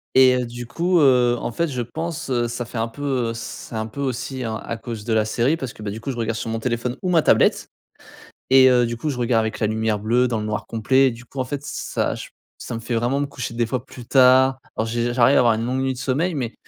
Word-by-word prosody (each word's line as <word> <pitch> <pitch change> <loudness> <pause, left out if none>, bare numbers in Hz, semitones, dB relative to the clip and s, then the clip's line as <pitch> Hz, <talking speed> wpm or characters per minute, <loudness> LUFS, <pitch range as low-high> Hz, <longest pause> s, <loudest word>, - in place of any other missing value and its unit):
et 130 -1 +6
heu, - - -3
du 120 +1 -7
coup, 170 +7 +1
heu, 125 -3 +4
en - - -3
fait, 170 +7 -1
je 125 -4 -3
pense, 160 +3 -5 0.2
ça 120 +1 -4
fait 115 - -6
un 115 - 0
peu, 145 +5 -9 0.3
heu, - - -3
c 115 - -6 0.3
c'est - - -7
un 110 0 -2
peu 125 +6 -7
aussi 130 0 -3
hein, 110 -2 -3
à 115 - -3
cause 115 -2 -7
de 115 - 0
la 110 -1 +3
série 120 +8 +1
parce 130 -7 -5
que, 110 - -11
bah, 100 - -3
du 110 - -7
coup, 135 - -5
je 125 - -4
regarde 115 -1 -1
sur 115 0 -4
mon 115 0 -2
téléphone 120 +1 -2
ou 185 - 0
ma 165 -3 +5
tablette - - +3 0.8
et 130 0 +7
heu, 125 -1 +4
du 115 0 -4
coup, 150 +6 -3
je 130 - -3
regarde 120 -1 +2
avec 110 0 -2
la 110 - +2
lumière 110 0 0
bleue 120 +4 +2
dans 115 -2 -1
le 105 - -4
noir 105 +1 -3
complet, 130 +4 +3
du 120 0 -9
coup, 135 +3 -10
en 130 - 0
fait 140 +1 -4
ç - - -6 0.2
ça - - 0
j - - -8 0.3
ça - - -6
me - - -4
fait 115 +1 -3
vraiment 120 +4 0
me 145 - 0
coucher 130 -4 -6
des 120 0 0
fois 125 +2 -3
plus 125 -2 -11
tard. 130 0 +5 0.2
Alors 110 - 0
j'ai 120 +1 -1
j'arrive 125 +2 +4
à - - +6
avoir 120 -2 +4
une 115 - -2
longue 130 +2 -1
nuit 135 0 0
de - - -11
sommeil 145 +8 0
mais 125 -6 -3
120 Hz, 290 wpm, -22 LUFS, 115-130 Hz, 0.8 s, et